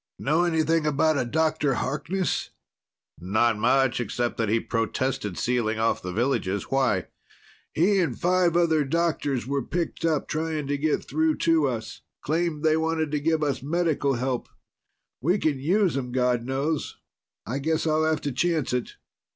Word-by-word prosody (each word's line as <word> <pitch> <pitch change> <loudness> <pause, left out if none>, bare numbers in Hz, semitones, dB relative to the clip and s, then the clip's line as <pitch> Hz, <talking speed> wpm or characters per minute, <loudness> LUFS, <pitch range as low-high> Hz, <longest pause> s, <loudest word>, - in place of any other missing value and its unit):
"Know 160 +5 +1
anything 160 -1 +1
about 150 +1 +2
a - - 0
Dr. 150 0 +1
Harkness?" 170 +9 -2 0.7
"Not 110 +4 +1
much, 125 +2 +2
except 120 +1 -2
that 115 -3 0
he 115 +2 +3
protested 115 -4 -2
sealing 120 -3 0
off 110 +1 +1
the 90 - -5
villages. 100 -3 -1
Why?" 130 -9 +2 0.7
"He 195 +5 +3
and 175 - -1
five 180 -1 +2
other 160 -3 +3
doctors 145 -4 -1
were 140 +1 -1
picked 170 +6 -3
up, 160 -3 +1
trying 155 -1 -2
to 145 +1 -1
get 155 +1 0
through 315 -1 +1
to 165 -3 +4
us. 115 -4 -5 0.2
Claimed 160 0 -1
they 155 0 +4
wanted 160 -1 -1
to 150 - 0
give 160 +1 +1
us 140 -3 -1
medical 150 -2 0
help. 125 0 -2 0.7
We 175 +9 +2
can 150 -7 0
use 180 +5 +2
them, 125 -2 -3
God 125 -2 +1
knows. 140 +4 -2 0.5
I 130 +4 -3
guess 160 +3 0
I'll 155 0 +2
have 155 -1 +1
to 145 - -2
chance 160 0 0
it." 125 -1 -2
145 Hz, 160 wpm, -25 LUFS, 125-160 Hz, 0.7 s, to